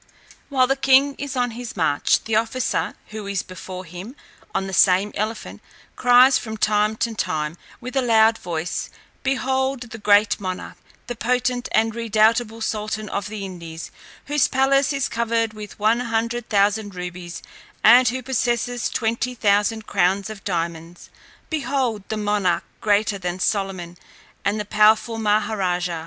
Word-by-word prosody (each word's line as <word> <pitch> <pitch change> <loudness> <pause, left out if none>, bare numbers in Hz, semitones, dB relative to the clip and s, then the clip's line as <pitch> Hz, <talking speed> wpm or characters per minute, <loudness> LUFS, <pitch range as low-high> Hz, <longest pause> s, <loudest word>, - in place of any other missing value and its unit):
"While 260 -3 +3
the 270 +1 +1
king 270 +1 +4
is 280 -1 -4
on 245 -1 0
his 235 -2 -8
march, 145 -4 +2
the 220 - -1
officer, 230 +3 0
who 215 -1 -7
is 200 -1 -2
before 185 0 -8
him 180 - -9 0.4
on 195 - -1
the 190 - -6
same 190 +3 +4
elephant, 215 +2 -4 0.3
cries 250 +2 +6
from 220 -1 -6
time 210 0 +2
to 230 +1 -1
time, 155 -6 -2 0.2
with 250 +1 -8
a 270 - +3
loud 225 -2 +4
voice, 170 -1 -4 0.3
'Behold 265 -2 -1
the 225 - -8
great 205 0 +4
monarch, 185 -2 -5 0.3
the 245 - -5
potent 250 +1 -1
and 225 0 +2
redoubtable 225 0 +1
sultan 215 -1 -3
of 200 -1 -3
the 210 -2 -5
Indies, 170 -3 -8 0.3
whose 290 -1 +2
palace 275 +1 +2
is 275 -1 0
covered 230 -1 -1
with 210 -1 -9
one 220 +3 +2
hundred 230 0 -2
thousand 205 -1 +1
rubies, 180 -1 -7 0.4
and 245 +3 +7
who 255 +3 -1
possesses 245 -1 -1
twenty 235 +2 -1
thousand 210 +1 +1
crowns 195 +4 +1
of 205 -2 -10
diamonds. 170 -1 -4 0.4
Behold 260 -9 -1
the 220 - -2
monarch 205 -4 0 0.2
greater 205 -1 +1
than 180 0 -4
Solomon, 185 -4 -2 0.4
and 205 +2 0
the 210 - -3
powerful 215 +2 +3
Maha 215 0 +1
raja.' 180 -3 -1
215 Hz, 150 wpm, -22 LUFS, 195-245 Hz, 0.4 s, and